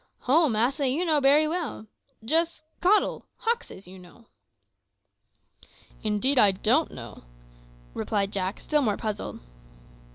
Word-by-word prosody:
"Ho, 305 +4 +3
massa, 255 +6 +1
you 295 +8 0
know 310 -3 +2
bery 290 +3 +4
well; 315 -9 -4 0.4
jist 325 +4 0 0.2
cottle 405 +4 +2
hoxes, 465 - -3
you 185 +1 -12
know." 180 +6 -17 1.8
"Indeed, 220 +6 +2
I 210 - +7
don't 190 0 +1
know," - - -11 0.7
replied 200 -2 -2
Jack, 190 0 -2
still 300 -1 0
more 215 -6 0
puzzled. 215 -2 -5
260 Hz, 120 wpm, -26 LUFS, 210-315 Hz, 1.8 s, I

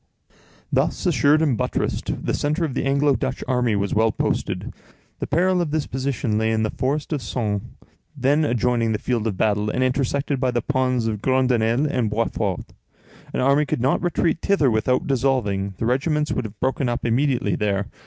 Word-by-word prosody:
Thus - - 0
assured 155 -2 +4
and 140 -6 +2
buttressed, - - -2
the - - 0
centre 150 +4 0
of 145 - -4
the - - -2
Anglo 140 +1 +3
Dutch 130 - -3
army 125 -4 +1
was 100 0 -1
well 110 +1 +3
posted. - - -2 0.5
The - - -3
peril 180 +4 +2
of 170 - -1
this 155 0 -1
position 130 -4 -1
lay 110 0 +1
in 110 0 +1
the 110 - -1
forest 145 +4 -2
of 145 - -2
Soignes, 105 -3 -2 0.6
then 140 +4 +2
adjoining 120 -4 +1
the - - 0
field 115 0 -1
of 100 -4 -3
battle, 105 0 +1
and 125 - 0
intersected 135 +1 0
by 130 -1 +1
the 120 -2 -1
ponds 130 -4 0
of 110 -2 -2
Groenendael 125 0 +2
and 125 -7 0
Boitsfort. 105 -3 -2 0.6
An - - -1
army 140 +3 +3
could - - -1
not 130 +4 +1
retreat 170 -1 0
thither 155 -10 +2
without 110 +4 +1
dissolving; 115 -8 0
the - - -2
regiments 150 +5 0
would - - -1
have 105 0 -9
broken 130 0 0
up 120 - -3
immediately 130 +2 +1
there. 100 -1 0
125 Hz, 185 wpm, -22 LUFS, 110-140 Hz, 0.6 s, assured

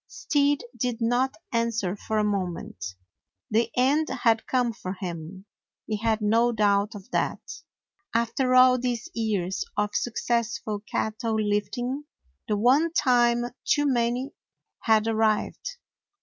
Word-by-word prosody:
Stead 290 -5 +1
did 245 -2 -2
not 245 +3 +1 0.2
answer 230 -5 0
for 215 +1 -3
a 215 - +3
moment. 180 - -3 0.6
The 225 +2 +2
end 285 +5 +3
had 230 -3 +1
come 245 -3 +1
for 185 -4 -5
him; 180 0 -7 0.4
he 215 - -2
had 220 0 0
no 230 +3 +3
doubt 205 -1 +2
of 205 +4 -11
that. - - -2 0.5
After 245 +3 +1
all 255 0 +7
these 240 -2 -2
years 205 -5 -1
of 210 0 0
successful 235 -2 -1
cat 215 -1 -1
tle 230 -3 -1
lifting, 245 +7 -1 0.4
the 210 - +1
one 270 +10 +4
time 240 -5 +3 0.2
too 290 -1 +2
many 245 0 0 0.5
had 220 -1 +3
arrived. 220 - 0
230 Hz, 130 wpm, -26 LUFS, 210-250 Hz, 0.6 s, all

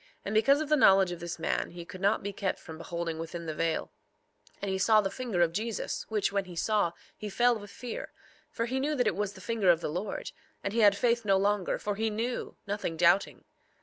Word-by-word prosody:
3:19 - - -27 0.2
And 200 - -3
because 275 +7 +4
of 310 - -3
the 305 - +5
knowledge 195 -8 +6
of 175 - -5
this 170 -1 -5
man 165 - -1
he 175 -1 -9
could 185 0 -10
not 200 +2 +2
be 200 0 -4
kept 195 -1 -2
from 160 0 -10
beholding 170 -1 -4
within 165 +1 -6
the 160 - -3
veil; 165 +1 -1 0.7
and 200 - -3
he 190 - -1
saw 215 +3 +5
the 195 -2 0
finger 220 -7 0
of 165 -1 0
Jesus, 220 +3 -3
which, 210 -3 0
when 200 -1 0
he 180 -1 -10
saw, 205 -1 +1 0.2
he 210 - -6
fell 240 +4 +3
with 205 0 -10
fear; 235 +3 -6 0.4
for 230 - -2
he 260 +3 -1
knew 295 +3 0
that 250 -3 +1
it - - +1
was 205 0 -2
the 190 - -12
finger 210 -2 +1
of 170 -2 +6
the - - -3
Lord; 185 +6 -4 0.3
and 200 - -2
he 230 - +1
had 205 -2 +6
faith 235 -1 +2
no 195 -2 +3
longer, 200 -1 +1
for 205 - -2
he 220 +2 0
knew, 230 +4 -3
nothing 200 -5 -3
doubting. 170 +4 +3
200 Hz, 245 wpm, -29 LUFS, 175-225 Hz, 0.7 s, knowledge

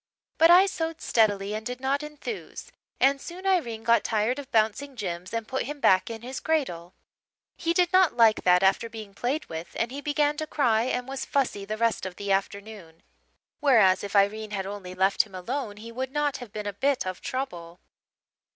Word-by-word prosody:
But 330 - +7
I 360 +3 +8
sewed 330 -4 -3
steadily 205 -3 +1
and 215 +1 -4
did 250 +2 -5
not 270 +2 0
enthuse, 300 +9 -7 0.3
and 275 0 +3
soon 360 +5 -9
Irene 245 -13 0
got 235 +1 +3
tired 225 +4 0
of 280 -1 -9
bouncing 225 +5 +1
Jims 180 -5 -5
and 230 -1 -3
put 260 0 -2
him 290 +3 -6
back 185 -6 +3
in 225 0 -7
his 260 +2 -5
cradle. 185 - -2 0.6
He 335 - -1
did 355 +1 +2
not 370 -9 +4
like 225 -2 +5
that 180 +1 +4
after 195 +4 +2
being 215 -3 -9
played 270 +9 -2
with, 160 +1 -8
and 230 +1 -1
he 280 +2 -6
began 295 0 +1
to 310 - -3
cry 235 -7 +2
and 250 0 -2
was 270 0 -4
fussy 250 -8 -1
the 215 +2 -4
rest 230 -4 0
of 180 - -9
the 200 +1 -4
afternoon, 195 -3 -3 0.6
whereas 225 -10 +4
if 205 0 -6
Irene 210 +2 +2
had 195 -2 -3
only 190 -2 -7
left 190 +1 +3
him 200 -3 -11
alone 215 +3 -4
he 230 +2 -9
would 260 +2 -4
not 295 -1 0
have 245 -5 -10
been 210 0 -6
a 205 - -3
bit 270 +4 0
of 185 -1 -5
trouble. 175 -10 -5
230 Hz, 200 wpm, -26 LUFS, 200-280 Hz, 0.6 s, I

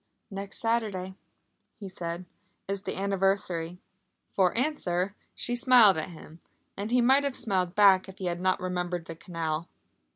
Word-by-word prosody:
"Next 195 0 -5
Saturday," 215 -5 -1 0.7
he 200 - -7
said, 175 -1 -6 0.4
"is 195 0 -3
the - - -5
anniversary!" 195 -3 -1 0.5
For 185 +1 +2
answer 200 - 0 0.2
she 240 - -1
smiled 240 - +6
at 155 - -5
him, 165 -1 -13 0.3
and 200 +2 -4
he 250 +1 +3
might 265 +4 +5
have 280 -2 -2
smiled 185 -5 -1
back 195 -2 +5
if 190 - -12
he 190 - -5
had 175 0 -2
not 185 0 +1
remembered 180 -2 -3
the 165 - -8
canal. 165 -1 -4
190 Hz, 155 wpm, -28 LUFS, 175-210 Hz, 0.7 s, smiled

